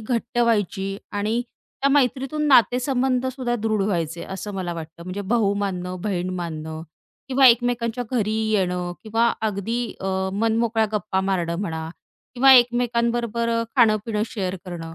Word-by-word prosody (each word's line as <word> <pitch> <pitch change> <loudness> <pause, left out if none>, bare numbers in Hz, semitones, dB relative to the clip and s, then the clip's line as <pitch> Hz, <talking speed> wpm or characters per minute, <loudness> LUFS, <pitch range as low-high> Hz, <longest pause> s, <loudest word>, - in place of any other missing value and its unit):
घट्ट 240 +2 -2
व्हायची 205 -4 +1 0.2
आणि 210 +3 0 0.4
त्या 275 - +4
मैत्रीतून 275 +2 +1
नातेसंबंधसुद्धा 255 0 +2
दृढ 215 -2 0
व्हायचे, 170 -4 -2
असं 195 +2 -6
मला 185 -2 -3
वाटतं 165 +1 -8
म्हणजे 185 +3 -5
भाऊ 220 -4 +3
मानणं, 180 -1 -4
बहीण 185 -3 -2
मानणं, 160 -2 -5 0.5
किंवा 265 0 +5
एकमेकांच्या 245 0 +2
घरी 215 -3 0 0.2
येणं 180 -3 0
किंवा 230 +2 +1
अगदी 215 +3 -2 0.2
अ, 190 - -2 0.2
मनमोकळ्या 225 +1 +1
गप्पा 210 -2 -1
मारणं 175 -3 -1
म्हणा 160 -5 -4 0.5
किंवा 265 +2 +7
एकमेकांबरोबर 235 -2 +2
अ, 230 0 +1
खाणं 225 -4 +5
पिणं 215 -2 -1
शेअर 190 -4 -3
करणं, 165 -3 -7
215 Hz, 135 wpm, -23 LUFS, 185-240 Hz, 0.5 s, किंवा